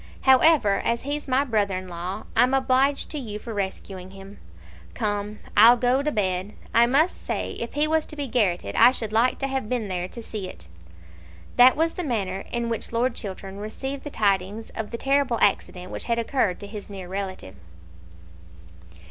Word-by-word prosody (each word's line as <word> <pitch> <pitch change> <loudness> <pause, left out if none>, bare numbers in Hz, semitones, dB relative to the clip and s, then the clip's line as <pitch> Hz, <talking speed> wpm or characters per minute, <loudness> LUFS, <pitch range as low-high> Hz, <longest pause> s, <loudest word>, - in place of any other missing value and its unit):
However, 265 -5 +5
as 235 0 0
he's 290 +2 -3
my 265 +1 +2
brother 210 -7 0
in 185 0 -7
law, 180 +4 -5
I'm 250 +3 +4
obliged 270 +1 +2
to 300 - -3
you 215 -6 -5
for 225 +2 -7
rescuing 190 -2 -5
him. 195 +1 -12 0.6
Come, 205 - -2 0.2
I'll 230 +4 +8
go 250 +3 +2
to 300 +1 -1
bed. 190 -3 -1 0.2
I 235 +1 +5
must 295 +8 +2
say, - - -3
if 235 - -5
he 295 +1 +4
was 315 0 +1
to - - -9
be 290 -1 -3
garrotted 205 -8 0
I 235 - +8
should 220 -4 -5
like 235 +3 +3
to 275 - -2
have 265 -5 -3
been 235 -5 -2
there 180 -1 -2
to 235 +5 -9
see 210 -4 -5
it." 85 - -10 0.9
That 250 +1 +7
was 325 +2 +1
the 360 - -4
manner 195 - -2
in 235 -1 -1
which 230 -1 -3
Lord 240 +2 +1
Chiltern 195 -2 -7
received 265 +6 -5
the 295 - -5
tidings 205 -2 -1
of 220 -1 -5
the 235 - -5
terrible 275 -2 +1
accident 180 -2 0
which - - -5
had 235 -1 0
occurred 230 -5 0
to - - -6
his 205 0 -9
near 190 -3 -8
relative. 190 - -5
225 Hz, 190 wpm, -24 LUFS, 195-260 Hz, 0.9 s, I'll